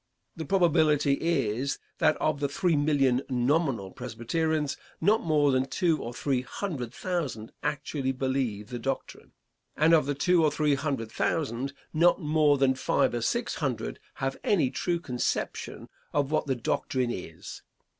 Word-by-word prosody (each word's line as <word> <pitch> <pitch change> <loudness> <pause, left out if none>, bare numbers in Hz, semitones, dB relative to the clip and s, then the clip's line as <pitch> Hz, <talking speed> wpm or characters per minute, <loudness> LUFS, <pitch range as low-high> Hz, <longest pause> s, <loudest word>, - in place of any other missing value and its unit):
The 160 - -5
probability 155 -5 +3
is 135 -5 0 0.2
that - - +3
of 140 - 0
the 140 -1 0
three 170 +3 +1
million 140 -4 +2
nominal 125 - +1
Presbyterians, 145 +6 -2 0.2
not 210 +6 +3
more 150 -3 +3
than 130 0 +1
two 165 -4 +1
or 120 - -5
three 130 +1 -1
hundred 130 - -5
thousand 140 -11 -3
actually 140 -2 -2
believe 130 -6 -2
the 120 - -5
doctrine, 135 +3 -5 0.4
and 160 +2 +4
of 155 -4 +4
the 145 - 0
two 175 +3 +3
or 155 - +5
three 150 0 +1
hundred 135 -5 -2
thousand, 135 -2 -1 0.2
not 170 +4 +4
more 150 -3 +3
than 135 -1 +3
five 130 -2 +1
or 120 - -1
six 115 - 0
hundred - - -3 0.2
have 135 0 -2
any 160 -11 +2
true 170 +5 -1
conception 125 -8 -3 0.3
of 145 -1 +1
what 155 - +1
the 135 - +1
doctrine 125 +1 -1
is. 80 -6 -8
140 Hz, 155 wpm, -28 LUFS, 125-155 Hz, 0.4 s, or